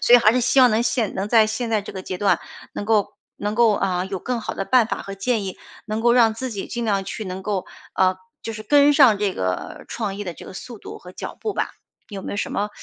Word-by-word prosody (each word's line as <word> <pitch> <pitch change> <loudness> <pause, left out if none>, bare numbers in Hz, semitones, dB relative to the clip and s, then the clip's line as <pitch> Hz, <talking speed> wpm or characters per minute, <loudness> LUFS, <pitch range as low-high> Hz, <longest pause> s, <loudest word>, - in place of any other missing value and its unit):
所 245 - +6
以 - - +12
还 220 -2 +5
是 250 - +2
希 265 +3 +4
望 250 -2 +7
能 220 +2 +2
现 225 -2 0
能 195 - -1
在 225 -1 +6
现 220 +2 -2
在 215 -2 +1
这 - - -8
个 190 - -6
阶 185 - -5
段 200 +1 +2 0.3
能 205 - -4
够 215 -2 +1 0.2
能 205 +1 -2
够 230 -3 +5
啊 185 -2 0
有 190 -1 -5
更 245 -2 -2
好 - - -4
的 195 - -3
办 250 -1 +4
法 - - -3
和 195 0 -7
建 225 +1 0
议， 190 -1 -6 0.3
能 215 +1 -2
够 235 +1 +4
让 230 -3 +5
自 255 +1 -4
己 200 - -5
尽 235 -1 -3
量 200 -3 0
去 215 +2 -5
能 185 0 -5
够 200 -3 -2 0.3
呃 185 0 +3 0.3
就 225 - -3
是 215 0 -7
跟 290 +4 +5
上 250 -8 +6
这 205 -2 0
个 90 0 -3
创意 205 -3 -4
的 175 -2 -5
这 - - -12
个 - - -9
速 230 +3 -9
度 - - -9
和 180 - -11
脚 - - -7
步 425 - -2
吧。 - - -2 0.4
有 195 -2 -6
没 - - -5
有 - - -4
什 - - -2
么 205 +1 -1
215 Hz, 295 characters per minute, -22 LUFS, 195-235 Hz, 0.4 s, 以